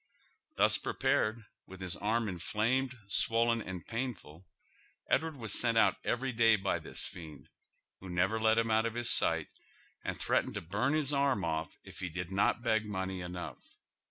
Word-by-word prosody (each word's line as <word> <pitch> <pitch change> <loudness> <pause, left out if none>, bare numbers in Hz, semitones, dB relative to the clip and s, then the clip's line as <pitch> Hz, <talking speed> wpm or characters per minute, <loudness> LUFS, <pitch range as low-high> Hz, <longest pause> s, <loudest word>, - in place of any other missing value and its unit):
" - - -41
Thus - - +5
prepai'cd, 110 +1 0 0.2
with 95 0 -11
his 95 -1 -3
arm 110 +2 0
inflamed, 115 +8 -1
swollen, 115 +3 +2
and 95 -4 -7
painful, 95 - -5 0.6
Edward 160 -1 +1
was 115 -6 -3
sent 115 -1 +3
out - - +4
every 130 +2 -1
day 115 -1 +5
by 95 -1 -1
this - - -3
fiend, 80 -5 -10 0.5
who 95 - -10
never 95 +5 +1
let 110 0 +4
him 115 -1 +2
out 110 +1 +3
of 115 - -5
his 120 -1 +2
sight, - - +2 0.5
and - - -4
threatened - - 0
to - - -3
bum 105 - 0
his 150 -2 +1
arm 140 -9 +2
off 80 0 -3
if - - -13
he 95 -2 -3
did 90 +2 -5
not 100 +4 +1
beg 110 -2 +2
money 95 -2 -3
enough. 90 0 -6
110 Hz, 175 wpm, -32 LUFS, 95-115 Hz, 0.6 s, Thus